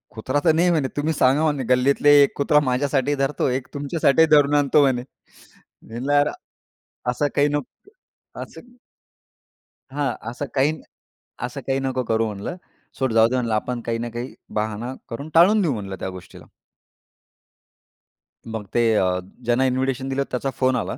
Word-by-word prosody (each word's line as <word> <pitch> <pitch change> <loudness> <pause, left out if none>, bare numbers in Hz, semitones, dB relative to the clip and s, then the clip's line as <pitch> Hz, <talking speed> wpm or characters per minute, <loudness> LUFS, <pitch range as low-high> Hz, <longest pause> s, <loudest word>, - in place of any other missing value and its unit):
"कुत्रा 130 +6 -1
तर 160 - +5
नाही 170 +3 +3
म्हणे." 150 -5 +1
तुम्ही 155 +2 0
सांगा 140 +1 +3
म्हणे, 145 -4 0
"गल्लीतले 140 +3 +3
1 140 - +1
कुत्रा 150 +1 +3
माझ्यासाठी 135 +2 0
धरतो, 135 +1 0
1 130 0 -2
तुमच्यासाठी 145 +2 +2
धरून 145 0 +4
आणतो 145 +1 +4
म्हणे." 130 -3 +2 0.6
म्हटलं, 125 +6 -6
"यार 145 +1 +4 0.8
असं 135 +4 0
काही 145 - +4
नको 145 - -5 0.5
असं." 245 0 -12 1.2
हां, 140 -2 -1 0.2
"असं 125 +4 -5
काही 140 +2 +2
नाही 155 - -9 0.6
असं 125 +3 -7
काही 135 0 +1
नको 130 -1 -2
करू 115 -1 0
म्हणलं, 105 - -5 0.4
सोड 130 -3 0
जाऊ 110 0 +5
दे 130 - -1
म्हणलं. 120 -3 -1
आपण 120 +3 -2
काही 115 0 -1
ना 120 +1 -4
काही 120 +2 -6 0.2
बहाणा 110 +3 -3 0.2
करून 140 +6 -6
टाळून 200 +6 +6
देऊ 165 -7 +1
म्हणलं 100 -4 -5
त्या - - -4
गोष्टीला." 95 -1 -12 2.0
मग 110 -2 -5
ते 120 - +2
अ, 90 -2 +1 0.3
ज्यांना 120 +3 +2
इन्व्हिटेशन 130 +1 -1
दिलं, 135 +1 0
त्याचा 130 +2 -2
फोन 130 -1 +2
आला 120 0 -3
130 Hz, 160 wpm, -22 LUFS, 120-145 Hz, 2.0 s, टाळून